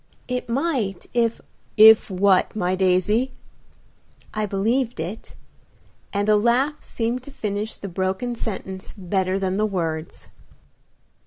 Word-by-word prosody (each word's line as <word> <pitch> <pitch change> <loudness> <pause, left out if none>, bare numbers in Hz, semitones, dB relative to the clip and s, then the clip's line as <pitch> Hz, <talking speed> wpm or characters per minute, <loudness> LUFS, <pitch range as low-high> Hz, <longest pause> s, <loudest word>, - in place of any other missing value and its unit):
"It 250 -1 -3
might 240 - -1
if 235 -2 +1 0.2
" - - -38
"If 220 0 +8
what, 190 +1 +2
my 185 -3 0
daisy?" 190 +7 +2 1.0
"I 215 -1 -1
believed 225 +6 0
it," 205 +6 -6 0.8
and 205 0 -1
a 215 - +5
laugh 245 +7 +2
seemed 235 +2 -2
to 255 - -12
finish 210 -3 -4
the 200 - -7
broken 190 +6 -2
sentence 190 -4 -6
better 190 0 0
than 190 -1 -1
the 215 +1 +2
words. 165 -5 -4
210 Hz, 130 wpm, -23 LUFS, 190-235 Hz, 1.0 s, If